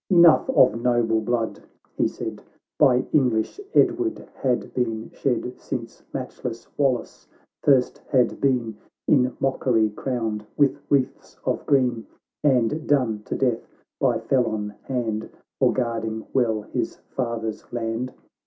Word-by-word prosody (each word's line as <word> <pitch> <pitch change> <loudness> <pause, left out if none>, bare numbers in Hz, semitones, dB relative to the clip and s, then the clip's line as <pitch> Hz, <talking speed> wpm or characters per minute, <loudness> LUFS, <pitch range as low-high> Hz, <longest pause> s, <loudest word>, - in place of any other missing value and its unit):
— - - -68
"Enough 170 +5 +6
of 115 - +4
noble 120 -2 +2
blood," 115 0 -1 0.3
he - - +2
said, - - -6 0.2
" - - -62
By 130 -3 +5
English 125 - +2
Edward 355 -2 +2
had 125 -2 -1
been 115 -3 -2
shed, 125 -2 -1
Since - - -6
matchless 115 -2 -5
Wallace 135 -4 -1 0.3
first 130 -3 +3
had 125 -2 +2
been 120 -6 +1 0.3
In 130 -3 +3
mockery 120 -5 +2
crowned 110 -3 -2
with 140 -2 +3
wreaths 135 -3 0
of - - 0
green, 125 -5 +2 0.4
And 135 +2 +2
done 125 -7 +2
to - - -3
death 125 -4 0 0.3
by 125 -4 +3
felon 110 -3 0
hand 115 -4 -2 0.3
For - - +4
guarding 115 -3 -2
well 115 -5 +1
his - - -3 0.2
father's 115 -4 -3
land. 120 +1 -2
125 Hz, 130 wpm, -24 LUFS, 115-135 Hz, 0.4 s, Enough